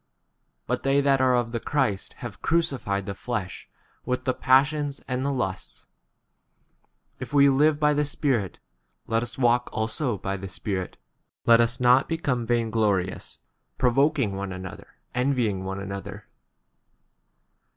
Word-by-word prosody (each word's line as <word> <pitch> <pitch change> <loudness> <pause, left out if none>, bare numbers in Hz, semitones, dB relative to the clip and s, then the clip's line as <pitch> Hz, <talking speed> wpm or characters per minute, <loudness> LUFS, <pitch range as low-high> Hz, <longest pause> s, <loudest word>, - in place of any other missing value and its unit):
But - - -1
they 135 +1 +2
that 140 -1 +3
are 130 -1 +4
of 120 -1 0
the 120 - -2
Christ 125 -8 -1
have 105 -5 -8
crucified 135 - 0
the 100 - -4
flesh 100 -3 -5 0.3
with 125 0 -2
the 130 - +2
passions 140 +3 +2
and 125 0 -2
the 140 - 0
lusts. 95 -8 -4 1.3
25 - - -23
If - - -17
we 140 0 +7
live 145 +3 +3
byi 150 -1 +2
the 150 0 +1
Spirit, 125 - -1 0.5
let 115 0 0
us 120 - -4
25 135 - -4
walk 120 +1 +3
also 110 +2 -1
by 95 +1 -3
the 95 0 -7
Spirit. 95 0 -4 0.5
Let 115 0 +7
us 115 +1 0
not 125 +2 +4
become 140 -8 -1
vain 115 -1 +1
glorious, 105 -5 -1 0.4
pro 125 -2 +3
voking 140 -3 +2
one 100 0 -4
another, 95 0 -8 0.3
envying 125 -7 0
one 95 +1 -4
another. 100 0 -7
120 Hz, 150 wpm, -25 LUFS, 100-140 Hz, 1.3 s, we